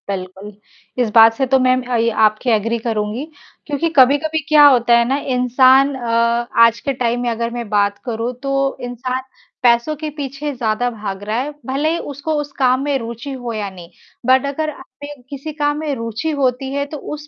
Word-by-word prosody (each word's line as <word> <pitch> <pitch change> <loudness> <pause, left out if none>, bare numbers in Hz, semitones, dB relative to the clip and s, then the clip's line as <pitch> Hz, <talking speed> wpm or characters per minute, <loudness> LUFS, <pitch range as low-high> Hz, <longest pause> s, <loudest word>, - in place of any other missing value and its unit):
बिल्कुल। 190 +1 -6 0.5
इस 230 - -2
बात 225 0 +8
से 265 +4 -1
तो 265 +1 +3
मैं 255 0 +3
म - - -2
अ, 235 -2 0
आपके 215 +3 +2
एग्री 230 +2 -1
करूँगी, 220 +3 -3 0.4
क्योंकि 305 +3 -1
कभी-कभी 290 +5 +4
क्या 300 -1 +7
होता 240 -3 +4
है 235 - +3
ना 270 +2 +1 0.2
इंसान 260 +2 +4
अ, 235 -1 0 0.2
आज 230 0 +1
के 275 - -2
टाइम 245 -1 -1
में 245 - -1
अगर 230 0 -2
मैं 240 -2 -5
बात 205 -1 +1
करूँ, 235 0 -3
तो 275 0 0
इंसान 250 +1 -4 0.4
पैसों 240 +5 +3
के 305 +1 -5
पीछे 290 0 -5
ज़्यादा 240 -1 -1
भाग 205 -4 -6
रहा 215 +2 -3
है, 280 +4 -3
भले 275 +5 0
ही 335 - -1
उसको 285 +3 -4
उस 290 -1 -8
काम 255 -1 +3
में 285 -1 0
रुचि 235 +3 -7
हो 245 -3 -5
या 210 -2 -3
नहीं। 180 -3 -13 0.4
बट 260 +2 +4
अगर 305 +3 -2
हमें 285 0 -11
किसी 280 +2 -6
काम 290 -1 -1
में 305 -2 -2
रुचि 230 +6 -3
होती 265 0 0
है 280 0 -1
तो - - -3 0.2
उस 300 0 -8
250 Hz, 200 wpm, -18 LUFS, 230-280 Hz, 0.5 s, बात